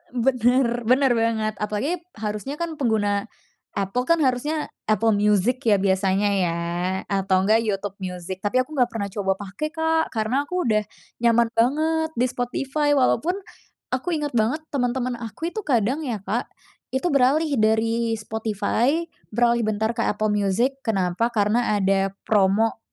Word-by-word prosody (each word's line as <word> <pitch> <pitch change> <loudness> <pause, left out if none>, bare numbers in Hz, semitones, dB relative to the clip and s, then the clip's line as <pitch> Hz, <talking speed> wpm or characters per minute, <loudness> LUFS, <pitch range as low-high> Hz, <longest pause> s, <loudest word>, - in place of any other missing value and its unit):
bener 245 -1 +2
bener 260 +2 +4
banget, 225 -2 0
apalagi 215 +12 -1 0.2
harusnya 215 +6 -4
kan 330 -2 -4
pengguna 205 -5 +1 0.5
Apple 200 +6 -1
kan 335 - +5
harusnya 295 +4 0 0.2
Apple 215 +1 +3
Music 210 +4 +2
ya 210 - +6
biasanya 195 +1 +1
ya 170 -2 0 0.5
atau 190 -1 +1
enggak 220 +2 +4
YouTube 200 -1 -3
Music, 180 0 -5
tapi 205 +4 +1
aku 255 - -20
nggak 245 - +4
pernah 210 -3 -3
coba 195 -1 0
pake 205 +9 -4
Kak, 320 0 +1
karena 245 +6 0
aku 360 0 -1
udah 215 -1 +2 0.4
nyaman 235 0 +4
banget 315 +7 +1
di 245 - +2
Spotify. 275 +4 0
Walaupun 280 +6 +2 0.6
aku 325 +7 -1
ingat 295 -2 -2
banget 240 +9 +1
temen-temen 250 -1 0
aku 235 +9 -5
itu 435 - -4
kadang 250 +2 +2
ya 235 -5 -2
Kak, 225 +7 -2 0.5
itu 265 +5 -1
beralih 285 +4 +3
dari 225 +1 +2
Spotify 220 - 0 0.3
beralih 235 +1 +3
bentar 220 +2 0
ke - - -2
Apple 215 0 0
Music, 210 +7 +1
kenapa? 195 0 0
Karena 215 +1 +2
ada 195 0 +2 0.2
promo, 210 +2 +2
230 Hz, 145 wpm, -23 LUFS, 205-265 Hz, 0.6 s, ya